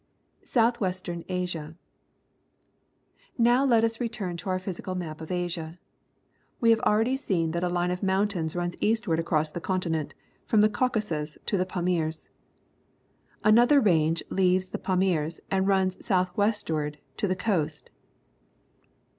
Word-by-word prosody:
,/)^ - - -42 0.4
S - - -4
outh 235 +1 +4
w 190 - +1
est 185 +1 -6
ern 170 -1 -4
Asia. 175 -4 -3 0.8
— 235 -1 -5
Now 250 +3 +4
let 235 -5 +4
us 230 0 0
return 220 -7 -3
to 190 - -6
our 185 - +1
physical 185 0 -5
map 160 -3 -5
of 160 - -8
Asia. 175 -2 -3 0.8
We 230 -1 +5
have 225 - +4
already 225 +5 +2
seen 175 - -1
that 170 +1 -2
a 180 - +1
line 175 0 0
of 180 - -3
mountains 190 -4 0
runs 175 0 -2
eastward 220 -7 +1
across 155 -2 0
the 175 - -6
continent 165 -4 -2 0.3
from 215 - +4
the 215 - +5
Caucasus 205 -10 -1
to - - 0
the 185 -1 0
Pamirs. 175 -4 -2 1.1
Another 240 +7 +6
range 165 - +2
leaves 185 0 +2
the - - -5
Pamirs 180 -4 0
and 190 0 +1
runs 190 -2 +1
south 185 -3 +1
westward 165 -8 0 0.2
to 205 - 0
the 185 - 0
coast. 160 -7 -2
185 Hz, 155 wpm, -27 LUFS, 165-210 Hz, 1.1 s, Another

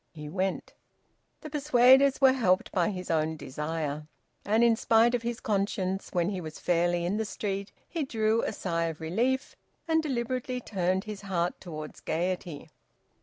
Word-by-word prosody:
He 150 -2 -8
went. 190 +3 -2 0.7
The 310 - -7
persuaders 275 -2 +5
were 265 -1 +6
helped 190 -8 +2
by 180 +1 +2
his 180 -3 -4
own 160 0 0
desire. 150 +1 -4 0.4
And 220 +3 +3
in 235 -1 +5
spite 225 +2 +4
of 245 - +1
his 235 0 -3
conscience, 195 -2 -1
when 175 -1 +1
he 190 -3 -3
was 155 -2 -7
fairly 175 0 +1
in 190 +4 0
the 220 - 0
street 200 -2 -4 0.2
he 330 -3 -2
drew 225 -3 +1
a - - -1
sigh 170 -5 -1
of 160 -1 -4
relief, 235 - -1 0.3
and 320 0 +3
deliberately 255 -2 -2
turned 190 -4 -1
his 210 -2 -7
heart 180 -3 -2
towards 155 -4 -8
gaiety. 170 -2 -3
195 Hz, 165 wpm, -28 LUFS, 170-235 Hz, 0.7 s, were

